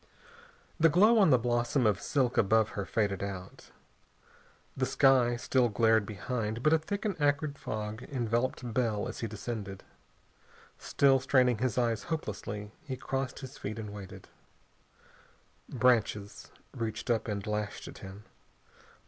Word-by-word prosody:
The 165 Hz, 0 st, +6 dB
glow 210 Hz, +8 st, +5 dB
on 195 Hz, -, +6 dB
the 130 Hz, -, +6 dB
blossom 120 Hz, +2 st, +1 dB
of 100 Hz, -2 st, +2 dB
silk 125 Hz, +2 st, 0 dB
above 110 Hz, +2 st, +3 dB
her 100 Hz, -, -4 dB
faded 100 Hz, -3 st, 0 dB
out. 95 Hz, -2 st, -7 dB, 1.1 s
The 130 Hz, -1 st, 0 dB
sky 130 Hz, -2 st, +4 dB
still 120 Hz, 0 st, +1 dB
glared 110 Hz, -1 st, +3 dB
behind, 110 Hz, +2 st, -3 dB
but 155 Hz, -, +4 dB
a 160 Hz, -, +4 dB
thick 200 Hz, +7 st, -4 dB
and 205 Hz, -, 0 dB
acrid 145 Hz, 0 st, +1 dB
fog 110 Hz, +1 st, -5 dB
enveloped 120 Hz, -1 st, -1 dB
Bell 110 Hz, -4 st, 0 dB
as -, -, -7 dB
he 115 Hz, -, -2 dB
descended. 105 Hz, -2 st, -6 dB, 1.0 s
Still 135 Hz, -1 st, +3 dB
straining 125 Hz, -3 st, +3 dB
his 130 Hz, -1 st, -1 dB
eyes 115 Hz, -3 st, 0 dB
hopelessly, 105 Hz, -, -5 dB
he 130 Hz, -4 st, -5 dB
crossed 135 Hz, +1 st, -3 dB
his 130 Hz, 0 st, -9 dB
feet 105 Hz, +2 st, -5 dB
and 105 Hz, -2 st, -6 dB
waited. 100 Hz, -3 st, -10 dB, 1.4 s
Branches 110 Hz, -5 st, 0 dB, 0.2 s
reached 115 Hz, 0 st, -3 dB
up 115 Hz, -1 st, 0 dB
and 100 Hz, -2 st, -3 dB
lashed 105 Hz, -1 st, -3 dB
at -, -, -10 dB
him. 95 Hz, +2 st, -10 dB
120 Hz, 140 wpm, -30 LUFS, 105-130 Hz, 1.4 s, The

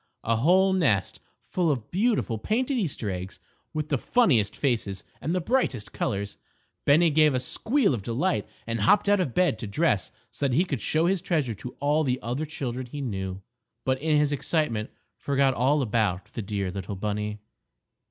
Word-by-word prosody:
A 115 Hz, 0 st, +1 dB
whole 185 Hz, +9 st, +4 dB
nest 130 Hz, -, +1 dB, 0.3 s
full 175 Hz, -3 st, 0 dB
of 125 Hz, -7 st, -2 dB
beautiful, 200 Hz, -, +1 dB
painted 250 Hz, -, 0 dB
Easter 150 Hz, -, -1 dB
eggs 90 Hz, +1 st, -6 dB, 0.3 s
with 155 Hz, -1 st, -3 dB
the 145 Hz, -4 st, +1 dB
funniest 125 Hz, -, +3 dB
faces 110 Hz, -8 st, -1 dB, 0.2 s
and 160 Hz, +5 st, -1 dB
the -, -, +2 dB
brightest 160 Hz, -, -1 dB
colors. 100 Hz, 0 st, -2 dB, 0.5 s
Bennie 160 Hz, +3 st, +5 dB
gave 150 Hz, -2 st, +4 dB
a -, -, +2 dB
squeal 220 Hz, -, +1 dB
of 115 Hz, -, -2 dB
delight 120 Hz, -, -1 dB, 0.2 s
and 115 Hz, 0 st, -2 dB
hopped 200 Hz, -, +4 dB
out 205 Hz, 0 st, +4 dB
of 155 Hz, -10 st, -1 dB
bed 175 Hz, -11 st, +2 dB
to 110 Hz, -, -5 dB
dress 105 Hz, -, +1 dB, 0.2 s
so 130 Hz, +4 st, -1 dB
that 125 Hz, -, 0 dB
he 175 Hz, +6 st, +3 dB
could 140 Hz, -9 st, -3 dB
show 160 Hz, +2 st, +1 dB
his 185 Hz, 0 st, +1 dB
treasure 155 Hz, -, 0 dB
to 125 Hz, +4 st, -9 dB
all 150 Hz, +2 st, +2 dB
the 130 Hz, -3 st, 0 dB
other 125 Hz, +6 st, -2 dB
children 130 Hz, -4 st, -4 dB
he 145 Hz, +4 st, -7 dB
knew, 95 Hz, -7 st, -4 dB, 0.4 s
but 130 Hz, 0 st, 0 dB
in 155 Hz, -1 st, +2 dB
his 150 Hz, -1 st, +2 dB
excitement 140 Hz, -6 st, -1 dB, 0.3 s
forgot 140 Hz, -1 st, +2 dB
all 135 Hz, +4 st, +2 dB
about 105 Hz, -5 st, -1 dB
the 115 Hz, -, -3 dB
dear 100 Hz, -2 st, -3 dB
little 100 Hz, +1 st, -5 dB
bunny. 105 Hz, +1 st, -3 dB
135 Hz, 180 wpm, -26 LUFS, 110-165 Hz, 0.5 s, Bennie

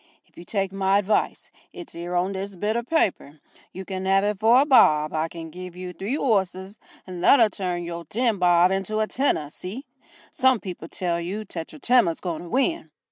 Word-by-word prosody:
If -, -, -32 dB
you 170 Hz, -, -11 dB
take 195 Hz, +1 st, -2 dB
my 195 Hz, 0 st, +2 dB
advice 205 Hz, +1 st, -1 dB, 0.2 s
it's 355 Hz, -3 st, -10 dB
'ere 175 Hz, +1 st, -5 dB
on 180 Hz, +2 st, +1 dB
this 195 Hz, +1 st, -5 dB
bit 210 Hz, +5 st, -1 dB
o' 235 Hz, -, 0 dB
paper 210 Hz, -, -1 dB, 0.3 s
you 190 Hz, +1 st, -8 dB
can 190 Hz, 0 st, -4 dB
'ave 195 Hz, +2 st, +3 dB
it 205 Hz, -, -9 dB
for 230 Hz, +4 st, +5 dB
a -, -, +2 dB
bob 155 Hz, -, +4 dB
I 160 Hz, +1 st, 0 dB
can 165 Hz, -1 st, -9 dB
give 180 Hz, +1 st, -9 dB
you 180 Hz, 0 st, -7 dB
three 210 Hz, -, -3 dB
'orses 195 Hz, -5 st, -1 dB, 0.3 s
that'll 200 Hz, +6 st, +4 dB
turn 180 Hz, -2 st, -3 dB
your 170 Hz, 0 st, -6 dB
ten 230 Hz, +3 st, 0 dB
bob 175 Hz, 0 st, +4 dB
into 195 Hz, +2 st, -2 dB
a 215 Hz, -, +2 dB
tenner 215 Hz, -, -1 dB
see? 215 Hz, -, -7 dB, 0.5 s
Some 260 Hz, -2 st, +3 dB
people 180 Hz, -4 st, -8 dB
tell 170 Hz, -1 st, -2 dB
you 200 Hz, +5 st, -5 dB
Tetratema's 170 Hz, -, 0 dB
going 170 Hz, -4 st, -4 dB
to 175 Hz, -, -10 dB
win." 325 Hz, -, 0 dB
190 Hz, 190 wpm, -24 LUFS, 175-215 Hz, 0.5 s, for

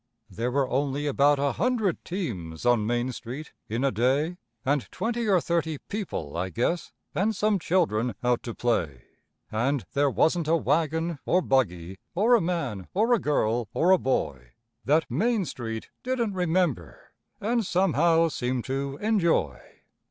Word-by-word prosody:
There 115 Hz, +6 st, -2 dB
were 135 Hz, +1 st, +1 dB
only 140 Hz, +3 st, -1 dB
about 145 Hz, 0 st, +3 dB
a 140 Hz, 0 st, +1 dB
hundred 220 Hz, -5 st, 0 dB
teams 105 Hz, -, -5 dB
on 120 Hz, -3 st, +3 dB
Main 120 Hz, +2 st, 0 dB
Street 130 Hz, +5 st, -8 dB, 0.2 s
in 115 Hz, +4 st, -1 dB
a 135 Hz, -, +3 dB
day, 135 Hz, -, +1 dB, 0.3 s
And 140 Hz, -1 st, 0 dB
twenty 235 Hz, 0 st, -2 dB
or 190 Hz, -2 st, +5 dB
thirty 165 Hz, -2 st, -1 dB
people, 170 Hz, -, -5 dB
I 90 Hz, +2 st, -2 dB
guess, 125 Hz, -, -1 dB, 0.2 s
and 210 Hz, +3 st, +1 dB
some 210 Hz, 0 st, +2 dB
children 125 Hz, -, +1 dB
out 125 Hz, -1 st, +2 dB
to 115 Hz, -, -6 dB
play. 80 Hz, -, -1 dB, 0.5 s
And 125 Hz, +4 st, 0 dB
there 145 Hz, -1 st, +3 dB
wasn't 160 Hz, +3 st, +2 dB
a 165 Hz, -, +4 dB
wagon 160 Hz, 0 st, 0 dB
or 180 Hz, 0 st, +2 dB
buggy, 95 Hz, -8 st, 0 dB, 0.2 s
or 220 Hz, +7 st, +4 dB
a 235 Hz, -, +6 dB
man 140 Hz, -, -2 dB
or 225 Hz, +5 st, +3 dB
a 235 Hz, -, +3 dB
girl 120 Hz, -, 0 dB
or 175 Hz, +3 st, +3 dB
a 190 Hz, -, +6 dB
boy 65 Hz, -, -2 dB, 0.3 s
That 155 Hz, +4 st, +3 dB
Main 205 Hz, -, +1 dB
Street 115 Hz, -6 st, -6 dB
didn't 245 Hz, -5 st, -1 dB
remember, 175 Hz, -, -1 dB, 0.3 s
and 230 Hz, +2 st, 0 dB
somehow 165 Hz, -3 st, +3 dB
seem 125 Hz, -4 st, -2 dB
to 135 Hz, +1 st, -3 dB
enjoy. 170 Hz, -, +1 dB
145 Hz, 155 wpm, -26 LUFS, 120-180 Hz, 0.5 s, a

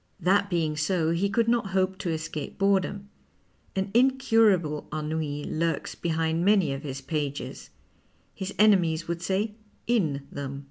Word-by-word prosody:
That 200 Hz, +2 st, +2 dB
being 165 Hz, -4 st, 0 dB
so, 160 Hz, +1 st, +1 dB
he 180 Hz, +4 st, +1 dB
could 230 Hz, +3 st, +1 dB
not 235 Hz, -3 st, +2 dB
hope 190 Hz, 0 st, +1 dB
to 185 Hz, -, -2 dB
escape 155 Hz, -2 st, -4 dB
boredom. 195 Hz, 0 st, +1 dB, 0.7 s
An 195 Hz, +1 st, -1 dB
incurable 225 Hz, -, +3 dB
ennui 150 Hz, -1 st, -3 dB
lurks 165 Hz, +2 st, -2 dB
behind 165 Hz, 0 st, -1 dB
many 195 Hz, -7 st, +3 dB
of 135 Hz, -, -5 dB
his 135 Hz, -2 st, -6 dB
pages; 145 Hz, -3 st, -4 dB, 0.6 s
his 190 Hz, +1 st, -5 dB
enemies 175 Hz, -6 st, +4 dB
would 170 Hz, 0 st, -3 dB
say 195 Hz, +4 st, -1 dB, 0.3 s
in 160 Hz, -13 st, +1 dB
them. 140 Hz, -1 st, -5 dB
170 Hz, 140 wpm, -27 LUFS, 155-200 Hz, 0.7 s, enemies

